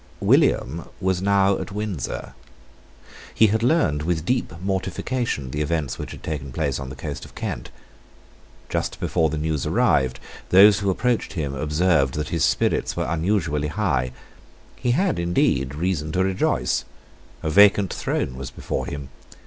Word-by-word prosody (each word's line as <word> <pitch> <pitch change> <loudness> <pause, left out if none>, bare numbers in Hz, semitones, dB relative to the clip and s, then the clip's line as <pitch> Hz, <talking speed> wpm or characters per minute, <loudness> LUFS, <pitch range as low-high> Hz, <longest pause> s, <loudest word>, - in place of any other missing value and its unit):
William - - +2
was 95 -1 0
now 100 0 +3
at - - -6
Windsor. 100 - -4 1.0
He 110 - +6
had 110 - +1
learned 120 - +2
with 80 0 -1
deep 125 +4 0
mortification 95 - -2
the 75 - -2
events 75 -3 -1
which - - -5
had - - -10
taken 70 -4 -4
place 70 -2 -1
on 70 -1 -6
the 65 - -8
coast 70 +2 -6
of - - -13
Kent. - - -4 1.0
Just - - -2
before 80 -3 +1
the 80 - -3
news 75 -2 -1
arrived, 65 -2 +2 0.3
those 100 +3 +7
who 100 -1 0
approached 120 +5 0
him 75 -6 -3
observed 75 0 +1
that 75 0 -3
his 85 -3 0
spirits - - +1
were - - 0
unusually 80 -3 0
high. 75 -8 0 0.6
He 125 - -2
had, 185 - +1
indeed, 70 -6 +1
reason 80 -2 -1
to 95 - +2
rejoice. 95 -10 0 0.6
A 80 - -1
vacant 100 +1 +5
throne 65 - -2
was 65 0 -6
before - - -4
him. 70 -2 -6
80 Hz, 155 wpm, -23 LUFS, 70-95 Hz, 1.0 s, those